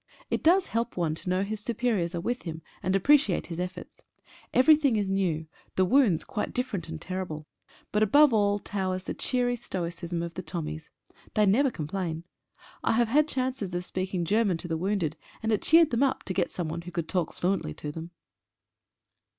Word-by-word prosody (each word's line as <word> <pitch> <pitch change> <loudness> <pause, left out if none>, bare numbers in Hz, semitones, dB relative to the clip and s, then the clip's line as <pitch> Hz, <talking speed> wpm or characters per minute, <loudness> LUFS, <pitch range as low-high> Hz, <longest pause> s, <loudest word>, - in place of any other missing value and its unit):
It - - 0
does 360 +4 +5
help 230 -1 -2
one 165 -3 +1
to 160 - -5
know 185 +1 +2
his 215 +1 -4
superiors 215 -6 -1
are 170 - -2
with 245 +6 -2
him, 160 -2 -6 0.2
and 185 +2 +1
appreciate 210 -1 +4
his 170 -1 -6
efforts. 180 0 -6 0.5
Everything 285 -1 +5
is 205 -2 0
new, 185 -5 0 0.3
the 185 - +3
wounds 220 - +4
quite 255 -6 -4
different 215 -10 -2
and 160 -1 -5
terrible, 180 -4 -5 0.5
but 210 - +1
above 285 +6 +6
all 205 -1 +3
towers 190 -2 -3
the - - -4
cheery 245 -1 0
stoicism 175 -5 -4
of 170 0 -5
the 185 - -5
Tommies. 155 -2 -5 0.5
They 210 - +4
never 250 +8 +4
complain. 165 -2 -4 0.6
I - - +2
have 235 0 +2
had 300 +5 +4
chances 255 - -2
of 175 0 -2
speaking 185 -2 -2
Ger 215 +6 +3
man 190 -6 +1
to 175 - -4
the 165 - -1
wounded, 170 -3 -1 0.3
and 220 - +1
it 215 - +2
cheered 325 -1 +5
them 235 - +1
up, 275 -2 +1
to 190 - -4
get - - +1
someone 170 -1 -4
who 175 +1 -9
could 170 -2 -3
talk 180 -4 0
fluently 180 - -1
to 150 - -5
them. 165 +2 -7
190 Hz, 190 wpm, -28 LUFS, 170-235 Hz, 0.6 s, above